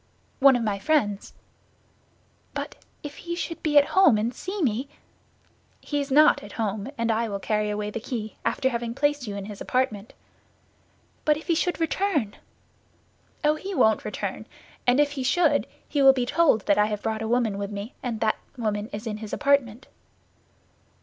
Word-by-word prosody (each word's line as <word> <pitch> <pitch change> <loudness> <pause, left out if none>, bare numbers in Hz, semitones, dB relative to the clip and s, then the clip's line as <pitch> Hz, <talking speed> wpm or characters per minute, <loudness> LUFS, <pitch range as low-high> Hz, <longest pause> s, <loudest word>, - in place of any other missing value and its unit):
"One 270 -1 +7
of 240 - 0
my 205 -2 -1
friends." 210 -8 0 1.2
"But - - -5 0.3
if 290 -1 -7
he 345 0 -5
should 340 -1 -5
be 295 -2 +2
at 290 0 +6
home 380 - +6
and 225 +4 -1
see 385 +8 -5
me?" 255 +2 0 0.9
"He 290 -1 -2
is 280 - -5
not 300 +3 +5
at 205 - -11
home, 215 +1 -3
and 230 0 +1
I 225 +1 0
will 200 - -2
carry 210 +1 -1
away 210 0 -3
the 230 - -4
key, 220 -2 -5
after 260 - +1
having 235 -1 -3
placed 290 -3 0
you 205 - -4
in 200 -1 -5
his 205 -1 -9
apartment." 225 -5 -1 1.1
"But 300 -1 +3
if 310 - -10
he 340 - +2
should 345 0 0
return?" 325 - 0 1.1
"Oh, 300 0 +4
he 380 +5 -5
won't 220 -7 +3
return; - - -5 0.4
and 245 +3 +4
if 295 -1 +3
he 280 -2 -4
should, 295 +2 +2 0.2
he 290 - 0
will 270 0 +8
be 255 -2 -1
told 265 -6 +3
that 200 - +3
I 210 - +4
have 210 -1 -4
brought 220 -1 -2
a 220 - -2
woman 225 -4 +1
with 200 0 -3
me, 205 +3 -6
and 235 -4 -4
that 220 -1 +2 0.2
woman 215 -3 -2
is 210 +3 -6
in 215 -2 -3
his 215 -1 -8
apartment." 275 -4 +1
240 Hz, 185 wpm, -25 LUFS, 210-290 Hz, 1.2 s, will